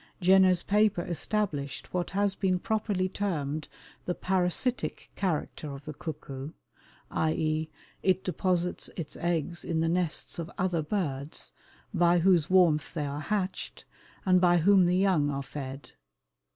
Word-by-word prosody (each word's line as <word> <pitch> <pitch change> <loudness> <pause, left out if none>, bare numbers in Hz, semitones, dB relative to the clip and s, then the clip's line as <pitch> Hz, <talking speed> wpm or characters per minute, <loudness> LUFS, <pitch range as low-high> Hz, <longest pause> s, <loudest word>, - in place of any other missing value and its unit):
Jenner's 185 -1 +5
paper 205 -3 +2
established 170 -7 -2
what 180 -1 -1
has 200 0 +1
been 190 -1 +1
properly 205 -2 0
termed 155 -7 -2 0.4
the 180 - -1
"parasitic" 190 +7 -1
character 160 -4 -2
of 140 +1 -12
the 155 - -5
cuckoo, 145 -2 -7 0.6
i. 160 0 +1
e., 155 0 -1 0.3
it 185 -1 +2
deposits 180 0 -1
its 165 -4 -5
eggs 170 0 -1
in 165 -2 -1
the 165 - +2
nests 170 -1 -1
of 165 -1 -4
other 180 -3 +1
birds, 150 -5 -3 0.4
by 175 -1 +4
whose 175 -2 +4
warmth 175 -5 +3
they 150 -3 -1
are 145 +1 -4
hatched, 190 +2 -3 0.4
and 185 -1 +5
by 175 -1 +5
whom 185 +1 +5
the 180 +1 +2
young 185 -7 +3
are 140 -1 -2
fed. 135 0 -7
175 Hz, 140 wpm, -29 LUFS, 155-190 Hz, 0.6 s, Jenner's